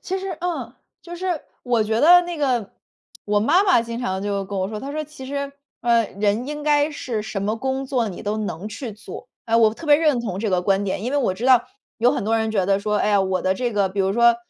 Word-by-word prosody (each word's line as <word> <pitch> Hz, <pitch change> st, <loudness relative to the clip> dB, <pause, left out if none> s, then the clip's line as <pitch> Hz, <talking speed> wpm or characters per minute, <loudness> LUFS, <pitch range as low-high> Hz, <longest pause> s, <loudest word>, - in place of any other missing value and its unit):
其 380 Hz, +1 st, -3 dB
实， 375 Hz, -3 st, -5 dB
嗯， 355 Hz, -1 st, -3 dB, 0.3 s
就 345 Hz, 0 st, -9 dB
是 360 Hz, -3 st, -2 dB, 0.2 s
我 240 Hz, -3 st, +1 dB
觉 220 Hz, +2 st, 0 dB
得 350 Hz, +4 st, +8 dB
那 350 Hz, -1 st, -5 dB
个 250 Hz, -8 st, -1 dB, 0.5 s
我 205 Hz, 0 st, +1 dB
妈 335 Hz, -, +4 dB
妈 370 Hz, -, +4 dB
经 235 Hz, +1 st, -5 dB
常 190 Hz, -5 st, -2 dB
就 200 Hz, -1 st, -2 dB
跟 195 Hz, 0 st, -5 dB
我 190 Hz, +1 st, -1 dB
说， 215 Hz, -1 st, -5 dB
她 280 Hz, +1 st, -6 dB
说： 310 Hz, 0 st, -2 dB
“其 285 Hz, -3 st, -11 dB
实， 280 Hz, 0 st, -4 dB, 0.3 s
呃， 235 Hz, -1 st, +3 dB
人 210 Hz, +4 st, +1 dB
应 295 Hz, 0 st, -5 dB
该 295 Hz, 0 st, +3 dB
是 235 Hz, -7 st, -4 dB
什 210 Hz, -2 st, -4 dB
么 215 Hz, +2 st, -1 dB
工 265 Hz, +2 st, -2 dB
作 245 Hz, -5 st, 0 dB
你 180 Hz, -, -8 dB
都 210 Hz, +1 st, -2 dB
能 205 Hz, -2 st, -4 dB
去 230 Hz, 0 st, -6 dB
做。 210 Hz, -, -10 dB, 0.2 s
“哎， 230 Hz, 0 st, +2 dB
我 220 Hz, -1 st, +4 dB
特 325 Hz, -, -10 dB
别 290 Hz, -1 st, +7 dB
认 300 Hz, -6 st, +2 dB
同 195 Hz, -6 st, -4 dB
这 215 Hz, 0 st, -1 dB
个 180 Hz, -1 st, +1 dB
观 195 Hz, +1 st, +1 dB
点。 195 Hz, +1 st, -2 dB
因 250 Hz, +4 st, -3 dB
为 290 Hz, -, +2 dB
我 190 Hz, -9 st, 0 dB
知 235 Hz, +7 st, -3 dB
道 255 Hz, -2 st, +6 dB, 0.3 s
有 240 Hz, +2 st, +4 dB
很 -, -, -2 dB
多 225 Hz, +1 st, +2 dB
人 220 Hz, 0 st, 0 dB
觉 195 Hz, -4 st, 0 dB
得 195 Hz, 0 st, +3 dB
说， 210 Hz, +1 st, -1 dB
哎 -, -, +1 dB
呀， 205 Hz, -1 st, +4 dB
我 190 Hz, -1 st, -1 dB
的 190 Hz, 0 st, +1 dB
这 245 Hz, +2 st, -2 dB
个 200 Hz, -2 st, +1 dB
比 195 Hz, +1 st, -3 dB
如 195 Hz, 0 st, +1 dB
说 235 Hz, +1 st, +5 dB
230 Hz, 280 characters per minute, -22 LUFS, 205-280 Hz, 0.5 s, 得